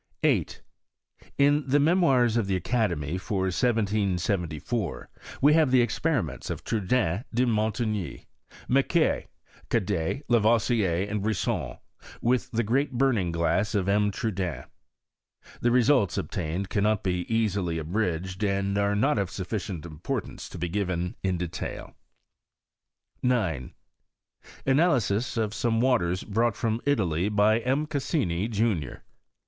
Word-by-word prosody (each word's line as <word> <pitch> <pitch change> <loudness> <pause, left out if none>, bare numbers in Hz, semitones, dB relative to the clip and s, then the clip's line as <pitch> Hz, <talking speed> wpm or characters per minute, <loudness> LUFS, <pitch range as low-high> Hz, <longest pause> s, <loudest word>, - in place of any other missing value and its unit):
8. - - +1 0.7
In 145 +1 +4
the 140 +2 +3
Memoirs 140 -8 +3
of 115 -4 +1
the 95 - +1
Academy, 90 - -1
for 95 +2 -2
1774, 95 - -1 0.3
wa 145 - +7
have 155 -2 +4
the 125 -1 +5
experiments 120 - -1
of - - -4
Trudaine, 105 -2 0
de 125 +2 +2
Monligny, 110 -3 -1 0.2
> - - -20
Macquer, 135 +5 +2 0.4
Cadet, 100 - -1
Lavoisier, 110 -5 +2
and 105 0 -2
Brisson, 105 -1 -1 0.4
with 125 +1 +1
tha 120 0 0
great 135 +5 0
burning 120 -9 +1
glass 85 +6 0
of 95 -2 0
M. 105 +1 +3
Trudaine. 95 - -3 1.0
The 120 - +2
results 120 -4 +3
obtained 90 +5 -3
cannot 105 0 +1
be 90 +1 -2
easily 100 -7 0
abridged, 90 +2 -2
and 100 0 0
are 100 0 +1
not 120 +3 +2
of 100 -3 -1
sufficient 95 -3 -4
importance 80 -1 -5
to - - -9
be 85 +1 -2
given 90 -1 -2
in 95 -2 0
detail. 85 -1 -5 1.3
i - - +2
9. 95 - 0 0.9
Analysis 130 - +2
of 110 -2 0
some 115 -1 0
waters 115 -8 +1
brought 110 +1 0
from 115 +1 -1
Italy 95 - +1
by 105 +1 +3
M. 130 +6 0
Cassini, 135 - -1
junior. 105 - -1
105 Hz, 125 wpm, -27 LUFS, 90-120 Hz, 1.3 s, wa